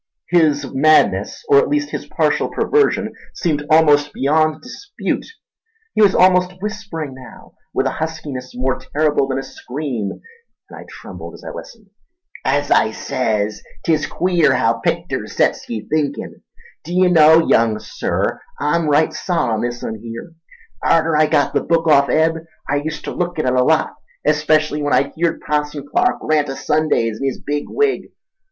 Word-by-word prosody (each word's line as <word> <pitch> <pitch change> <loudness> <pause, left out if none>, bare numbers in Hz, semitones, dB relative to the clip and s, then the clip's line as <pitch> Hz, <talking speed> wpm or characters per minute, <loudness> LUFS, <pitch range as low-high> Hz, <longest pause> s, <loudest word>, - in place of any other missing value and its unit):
His 155 -5 +3
madness, 155 - +2
or 425 -1 +6
at 465 - +1
least 295 0 -1
his - - -5
partial - - 0
perversion, 435 -1 +1 0.2
seemed 150 -3 -1 0.5
beyond 155 +3 +1
dispute. 405 +11 -5 0.7
He - - +1
was 200 -2 +5
almost 180 0 +4
whispering 200 -8 -5
now, 130 0 -14 0.2
with - - 0
a - - +1
huskiness 145 -5 -5
more 130 +1 -1
terrible 150 -2 0
than 135 -1 -2
a 135 - -3
scream, 125 -8 -5 0.6
and - - -11
I - - -11
trembled - - -10
as - - -15
I - - -6
listened. 215 -4 -11 0.5
"As 145 +2 0
I - - +4
says, 110 -4 -2 0.2
'tis 155 -3 +1
queer 170 -7 +2
haow 115 -2 +1
picters - - -2
sets - - 0
ye 110 -2 -5
thinkin'. 145 -2 -2 0.4
D'ye 180 +2 +2
know, 160 -1 +6
young 115 -2 +3
Sir, 110 - -2 0.2
I'm 155 +1 +1
right 150 +2 +3
sot 170 -10 -1
on 110 - -1
this 120 0 -4
un 110 -1 -5
here. 115 +9 -8 0.5
Arter 165 -1 +2
I 155 0 +4
got 145 -2 +1
the - - +1
book 165 -1 +1
off 140 -2 +5
Eb 160 +1 +2 0.3
I 145 +1 +1
uster 150 -1 -5
look 175 -1 -3
at 155 - -1
it 125 - +1
a 125 0 +3
lot, 160 +3 +2 0.3
especial 155 0 +2
when 145 0 0
I'd - - +2
heerd 170 0 -1
Passon 150 -1 -2
Clark 370 +1 +1
rant 150 -2 +1
o' 135 - -4
Sundays 115 -10 0
in 135 - 0
his 135 - -3
big 145 0 -3
wig. 430 -1 0
150 Hz, 165 wpm, -19 LUFS, 135-170 Hz, 0.7 s, or